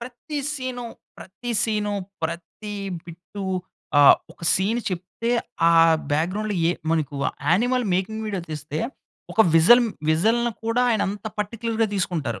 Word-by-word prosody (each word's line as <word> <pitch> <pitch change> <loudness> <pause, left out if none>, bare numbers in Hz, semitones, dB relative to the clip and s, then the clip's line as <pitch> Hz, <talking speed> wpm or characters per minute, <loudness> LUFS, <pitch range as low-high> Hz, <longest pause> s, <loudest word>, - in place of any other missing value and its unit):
ప్రతీ 255 +5 -6
సీను 255 -3 -4 0.3
ప్రతీ 220 +6 -8
సీను, 210 -2 0 0.3
ప్రతీ 170 +6 -5 0.3
బిట్టు 175 +4 -9 0.6
ఆహ్, 145 - +9 0.2
ఒక - - -23
సీన్ 205 +5 +1
చెప్తే 185 +6 -4 0.4
ఆ - - +5 0.4
బ్యాక్‌గ్రౌండ్‌లో 195 +7 0
ఏ - - +4 0.2
మనకు 155 -3 0 0.3
యానిమల్ 245 +9 +2
మేకింగ్ 195 +5 -1
వీడియో 200 -3 -2
తీస్తే, 150 0 -5 0.5
ఒక 225 - +3
విజల్ 210 +10 +7 0.3
విజల్‌ని 225 +9 +2
కూడా 230 +2 +2
ఆయన 220 - +2
అంత 205 +2 -6
పర్టిక్యులర్‌గా 225 +2 -1
తీసుకుంటారు. 160 - -2
210 Hz, 125 wpm, -23 LUFS, 170-235 Hz, 0.6 s, ఆహ్